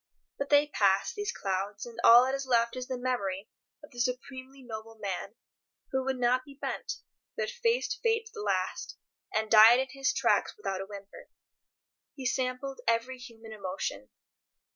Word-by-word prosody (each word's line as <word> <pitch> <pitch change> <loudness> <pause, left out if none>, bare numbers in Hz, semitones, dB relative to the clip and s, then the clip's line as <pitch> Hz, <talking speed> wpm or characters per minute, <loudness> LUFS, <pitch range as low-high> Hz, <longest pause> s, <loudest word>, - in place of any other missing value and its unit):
But 280 0 -2
they 290 0 +6
pass, 200 - +2
these 415 -2 -3
clouds, 195 +1 -3
and 235 -1 -10
all 240 +2 +9
that 265 - -1
is 275 0 -3
left 235 -1 +2
is 255 0 -5
the 255 - -3
memory 210 -6 -2 0.3
of 295 - -13
the 240 - -10
supremely 260 +2 -4
noble 225 -1 -8
man, 200 -4 -5 0.6
who 265 -1 0
would 265 0 -1
not 250 +1 +2
be 280 0 -14
bent, - - -3 0.4
but 475 0 -1
faced 485 0 0
Fate 455 -1 +1
to 445 - -13
the 430 - -6
last, - - -2 0.3
and 215 0 -1
died 225 +2 +9
in 265 0 -1
his 275 +1 0
tracks - - +1
without 195 - -3
a 195 - -6
whimper. 200 -1 -11 0.9
He 265 - -7
sampled 255 +2 -2
every 230 +3 +1
human 225 -3 -12
emotion. 185 - -4
250 Hz, 170 wpm, -30 LUFS, 215-270 Hz, 0.9 s, all